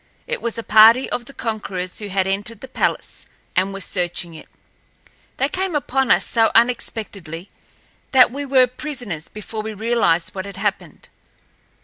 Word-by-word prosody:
It - - -4
was 235 -1 -1
a 230 - -4
party 225 +5 +7
of 240 - -2
the 275 - -11
conquerors 195 -7 -4
who 210 - -4
had 190 -1 0
entered 205 +3 -3
the 265 - -8
palace - - -2 0.3
and 190 +2 +2
were 195 0 -6
searching 175 -2 -3
it. 160 - -12 0.9
They 270 - +2
came 370 +2 -2
upon 270 -2 0
us - - +5
so 225 -2 +3
unexpectedly 205 -7 0 0.6
that 255 -3 +6
we 280 +3 -4
were 260 -2 +4
prisoners 250 - -5
before 215 +1 -6
we 215 0 -6
realized 205 -7 +1
what 190 0 -5
had 200 - -7
happened. - - -4
220 Hz, 160 wpm, -21 LUFS, 190-250 Hz, 0.9 s, party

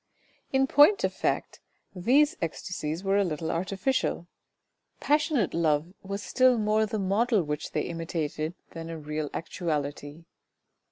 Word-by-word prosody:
In 265 0 +3
point 295 +9 +5
of - - +1
fact, - - -2 0.4
these 270 - +3
ecstasies 165 0 -4
were 195 0 +2
a 200 - +4
little 160 -2 -2
artificial. 190 +3 -1 0.7
Passionate 295 - +1
love 160 +1 +1
was 200 +1 -5
still 255 +1 +4
more 215 0 +2
the 215 - -3
model 205 +2 +2
which 150 0 -4
they - - 0
imitated 165 -1 -3 0.2
than 165 0 -7
a 165 - -5
real 150 -1 -4
actuality. 150 -2 -4
180 Hz, 130 wpm, -28 LUFS, 160-220 Hz, 0.7 s, point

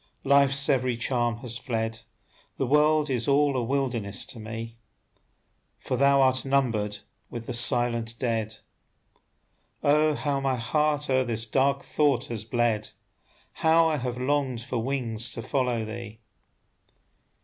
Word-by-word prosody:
Life's 140 0 +4
every 130 -4 +1
charm 120 -1 0
has 120 0 -2
fled, 115 -4 -3 0.6
The 135 - 0
world 150 +3 +3
is 120 -3 0
all 140 0 +3
a 125 - 0
wilderness 120 -5 -1
to 120 - -8
me; 115 +1 -7 1.0
"For 130 - -3
thou 140 +1 +4
art 130 -1 +3
numbered 115 -7 0 0.3
with 115 -1 -7
the - - -4
silent 120 -1 +1
dead." 115 -3 -2 1.3
Oh, 150 +1 +3
how 140 -2 -1
my 135 -1 0
heart 150 +5 0
o'er 130 0 +3
this 115 -2 -2
dark 135 +4 +1
thought 140 -5 +1
has 110 -2 -5
bled! 115 -2 0 0.6
How 165 +1 +3
I 155 - 0
have 125 -2 -4
longed 130 -2 -1
for 125 0 -3
wings 120 -2 -1
to 115 - -5
follow 125 -3 -1
thee! 110 0 -8
125 Hz, 140 wpm, -26 LUFS, 115-140 Hz, 1.3 s, Life's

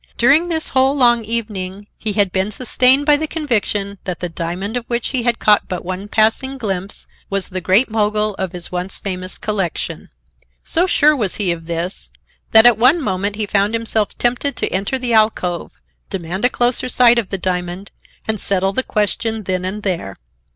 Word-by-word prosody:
During 285 +8 +4
this 320 -2 -2
whole 265 +2 +2
long 240 -3 +4
evening, 205 -3 -2
he 215 -2 -3
had 200 -2 +2
been 190 +2 0
sustained 255 +5 +3
by 295 -1 +5
the 315 +1 -3
conviction 210 - -2
that 180 -2 -4
the 175 - -3
diamond 175 +6 -4
of 245 - -2
which 235 -1 -2
he 260 -3 0
had 235 -1 +1
caught 210 -1 +3
but 180 -1 -5
one 185 +2 -5
passing 225 +6 +1
glimpse 195 -5 -3 0.2
was 195 -1 -1
the 185 0 -4
Great 190 +9 +4
Mogul 215 -1 0
of 190 -2 -2
his 175 -1 -5
once 180 +1 -2
famous 185 -1 -4
collection. 195 -6 -3 0.5
So 350 +3 +1
sure 305 -3 +4
was 210 -9 -1
he 195 -4 +1
of 165 -1 -5
this, 170 +2 -2 0.4
that 220 +1 +8
at 240 -3 +6
one 260 +8 +5
moment 205 - -2
he 215 0 0
found 205 +2 +1
himself 225 -2 -1
tempted 245 +3 0
to - - -1
enter 195 +8 -1
the 250 -2 -2
alcove, 215 -6 +1 0.4
demand 190 +2 -3
a - - +5
closer 245 0 +1
sight 240 -1 +5
of 215 - -3
the 195 - -2
diamond 180 +1 -4 0.4
and 220 -1 -1
settle 195 0 0
the 260 - +1
question 220 0 -1
then 185 -1 -2
and 195 +3 -4
there. 170 - -3
210 Hz, 190 wpm, -18 LUFS, 185-240 Hz, 0.5 s, that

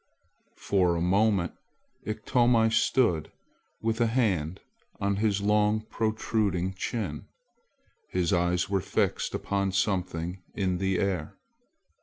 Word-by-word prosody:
For 90 -3 +2
a - - -1
moment 95 0 +2 0.6
Iktomi 115 +1 +2
stood 110 - +2 0.5
with 115 +1 0
a 115 - +4
hand 95 -8 0 0.4
on 100 0 0
his 105 -1 +1
long 105 +1 +2
protruding 110 -4 -1
chin. 95 -5 -4 0.8
His 90 +1 0
eyes 90 0 +1
were 95 -1 0
fixed - - -1
upon 100 -1 -1
something 90 -3 -1
in 95 -3 0
the 95 -1 +1
air. 90 -6 -2
100 Hz, 110 wpm, -28 LUFS, 90-110 Hz, 0.8 s, a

